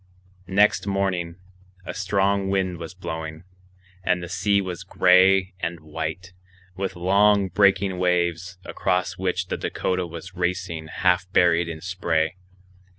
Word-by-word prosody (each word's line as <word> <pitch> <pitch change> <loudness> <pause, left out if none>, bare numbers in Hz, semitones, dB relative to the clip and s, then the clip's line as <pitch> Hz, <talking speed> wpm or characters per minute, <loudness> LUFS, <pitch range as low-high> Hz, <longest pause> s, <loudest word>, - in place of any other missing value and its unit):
Next 100 +2 +3
morning 95 -4 -1 0.5
a - - -5
strong 100 0 0
wind 95 -3 -1
was 85 +1 -8
blowing, 80 -3 -6 0.6
and 90 0 +1
the 85 - -7
sea 100 +2 +1
was 95 -2 -5
gray 95 +1 +4
and 85 -1 -3
white, 80 +4 -6 0.4
with 95 -1 -3
long 100 +2 +3
breaking 95 -1 +2
waves, 90 0 0
across 90 0 -1
which 90 -1 -1
the - - -2
Dakota 90 -1 -2
was 85 +3 -9
racing 90 -2 -3
half 90 +2 +1
buried 85 -2 +3
in 80 -1 -7
spray. 85 -3 -1
90 Hz, 130 wpm, -24 LUFS, 85-95 Hz, 0.6 s, gray